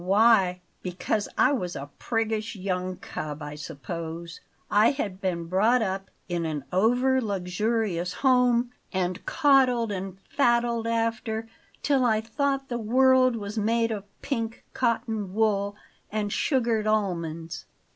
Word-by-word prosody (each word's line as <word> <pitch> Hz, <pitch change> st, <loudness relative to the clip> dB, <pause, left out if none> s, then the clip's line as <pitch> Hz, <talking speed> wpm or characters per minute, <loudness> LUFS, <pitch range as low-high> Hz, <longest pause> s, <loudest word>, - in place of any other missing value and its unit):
"Why? 195 Hz, -2 st, +4 dB, 0.2 s
Because 185 Hz, +3 st, -2 dB
I 260 Hz, -, +5 dB
was 180 Hz, -11 st, -2 dB
a 140 Hz, +1 st, -7 dB
priggish 225 Hz, -1 st, -1 dB
young 185 Hz, -1 st, -2 dB
cub, 150 Hz, 0 st, -6 dB
I 150 Hz, 0 st, -6 dB
suppose. 165 Hz, +2 st, -6 dB, 0.3 s
I 210 Hz, +2 st, +6 dB
had 200 Hz, -9 st, -3 dB
been 175 Hz, -3 st, -1 dB
brought 215 Hz, +8 st, +3 dB
up 195 Hz, -1 st, -3 dB, 0.2 s
in 175 Hz, -1 st, -1 dB
an 155 Hz, -3 st, -3 dB
over 245 Hz, +7 st, +3 dB
luxurious 195 Hz, -2 st, -1 dB
home, 250 Hz, -1 st, +3 dB, 0.2 s
and 185 Hz, -1 st, -1 dB
coddled 255 Hz, -6 st, +4 dB
and 190 Hz, -1 st, -5 dB
faddled 235 Hz, -3 st, +2 dB
after 225 Hz, -1 st, -1 dB, 0.4 s
till 275 Hz, -3 st, +3 dB
I 220 Hz, -3 st, +3 dB
thought 270 Hz, +4 st, -1 dB
the 240 Hz, -2 st, -3 dB
world 255 Hz, +2 st, +4 dB
was 210 Hz, 0 st, -4 dB
made 230 Hz, +2 st, +1 dB
of 205 Hz, -2 st, -4 dB, 0.2 s
pink 230 Hz, -5 st, -3 dB
cotton 220 Hz, -5 st, -1 dB
wool 205 Hz, -2 st, +1 dB, 0.4 s
and 210 Hz, -1 st, -1 dB
sugared 230 Hz, -6 st, +1 dB
almonds. 170 Hz, -6 st, -1 dB
215 Hz, 130 wpm, -26 LUFS, 185-235 Hz, 0.4 s, I